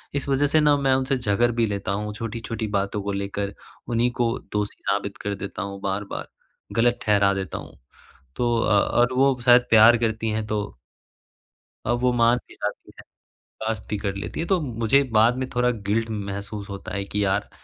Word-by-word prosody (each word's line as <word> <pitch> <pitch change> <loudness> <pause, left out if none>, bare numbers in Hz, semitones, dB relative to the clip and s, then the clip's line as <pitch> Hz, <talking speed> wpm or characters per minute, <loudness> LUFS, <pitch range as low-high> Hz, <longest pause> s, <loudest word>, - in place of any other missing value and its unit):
इस 140 - -1
वज़ह 135 +1 +3
से 155 +2 +3
ना 150 -1 +5
मैं 135 -2 +2
उनसे 135 +1 0
झगड़ 120 0 +1
भी 115 -1 +1
लेता 100 -2 -3
हूँ, 105 +1 -3
छोटी-छोटी 115 0 -4
बातों 100 0 -1
को 100 - -2
लेकर 100 0 -3 0.3
उन्हीं 120 +1 +2
को 120 0 +1
दोषी 105 -1 -3
साबित 100 0 -2
कर 100 0 -2
देता 100 0 -6
हूँ 100 0 -5
बार-बार, 100 +1 -3 0.5
गलत 120 +1 +3
ठहरा 100 -2 +3
देता 95 -1 -4
हूँ - - -10 0.6
तो 120 -1 +1
अ 105 -2 +3 0.2
और 120 +1 +3
वो 135 0 +3
शायद 120 0 +7
प्यार 115 +1 +7
करती 110 -1 -1
हैं 110 0 -1
तो 105 - -3 1.1
अब 120 +2 +1
वो 125 0 +2
मान 120 0 +4
भी - - -15
जाती - - -5
है, - - -11 0.6
बर्दाश्त 110 -1 -3
कर 100 -2 -2
लेती 100 +9 -5
है। 165 - -1
तो 190 -2 +2
मुझे 120 0 +2 0.2
बाद 115 +3 +5
में 130 - -2
थोड़ा 125 0 +3 0.2
गिल्ट 115 +2 +1
महसूस 100 0 -5
होता 100 -1 -7
है 100 - -2
कि 105 +1 -1
यार 100 +1 0
110 Hz, 190 wpm, -24 LUFS, 100-120 Hz, 1.1 s, शायद